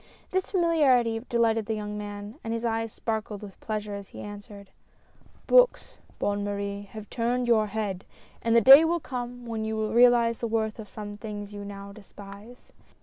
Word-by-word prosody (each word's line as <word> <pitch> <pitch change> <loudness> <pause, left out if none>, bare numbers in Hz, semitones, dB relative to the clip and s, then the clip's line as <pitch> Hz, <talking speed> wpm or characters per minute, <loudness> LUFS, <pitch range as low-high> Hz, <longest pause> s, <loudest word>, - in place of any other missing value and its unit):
This 375 0 -1
familiarity 285 - +3
delighted 225 -3 +1
the 220 - -1
young 210 0 -5
man, 205 +4 -7
and 225 - -4
his 230 +1 -3
eyes 225 -1 -1
sparkled 215 -2 -4
with 200 -2 -11
pleasure 210 -1 -4
as 200 -1 -7
he - - -12
answered: 205 -1 -10 0.4
" - - -30
Books, - - +3 0.2
Bonne 205 0 -1
Marie, 200 0 -4
have 215 -1 -8
turned 245 +1 0
your 220 -2 +3
head, 205 -3 -3 0.4
and 230 0 +1
the 235 - +7
day 270 +7 +10
will 340 +1 +1
come, 245 -3 -6
when 225 -2 -3
you 220 0 -2
will 215 0 -2
realize 235 -1 +5
the 235 - -2
worth 220 -1 -1
of 210 -2 -8
some 205 -1 -8
things 205 -1 -7
you 205 0 -7
now 200 0 -8
despise. 200 +3 -13
220 Hz, 185 wpm, -27 LUFS, 205-235 Hz, 0.4 s, day